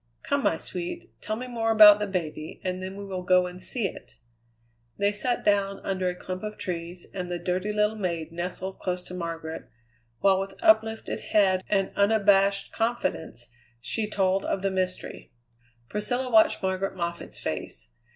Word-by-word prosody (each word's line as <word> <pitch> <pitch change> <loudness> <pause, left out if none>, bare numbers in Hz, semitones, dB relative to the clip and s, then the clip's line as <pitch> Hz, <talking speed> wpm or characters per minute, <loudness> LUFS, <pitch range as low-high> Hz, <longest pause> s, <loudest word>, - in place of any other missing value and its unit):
Come, 285 -1 0
my 165 - +2
sweet, 185 - -6
tell 215 - -2
me 250 +3 -5
more 230 -2 -1
about 210 -2 +9
the 210 - -1
baby, 160 -5 -4
and 185 0 -2
then 190 +1 -6
we 200 - -6
will 190 -2 -4
go 180 0 +4
and 180 +1 -6
see 230 +2 -1
it." - - -11 0.8
They 200 0 +2
sat 240 +4 -2
down 200 -1 +2
under 185 -2 0
a 180 - -4
clump 185 +1 -6
of 215 0 -5
trees, 175 0 -5
and 180 -2 -4
the 175 - -2
dirty 180 +4 -1
little 210 +1 +2
maid 170 -6 -3
nestled 180 +2 -4
close 180 -1 -2
to 180 - -11
Margaret, 165 -2 -5 0.5
while 195 -1 +4
with 195 0 -4
uplifted 225 -10 +3
head 190 -3 +2
and 195 -2 +1
unabashed 200 -1 +3
confidence 225 - -2 0.3
she 210 - -2
told 195 -1 +1
of 195 - -2
the 195 - +1
mystery. 185 -1 -3 0.6
Priscilla 245 - -2
watched 220 -3 +5
Margaret 190 +1 -1
Moffatt's 170 -1 -4
face. - - -5
195 Hz, 170 wpm, -27 LUFS, 180-210 Hz, 0.8 s, about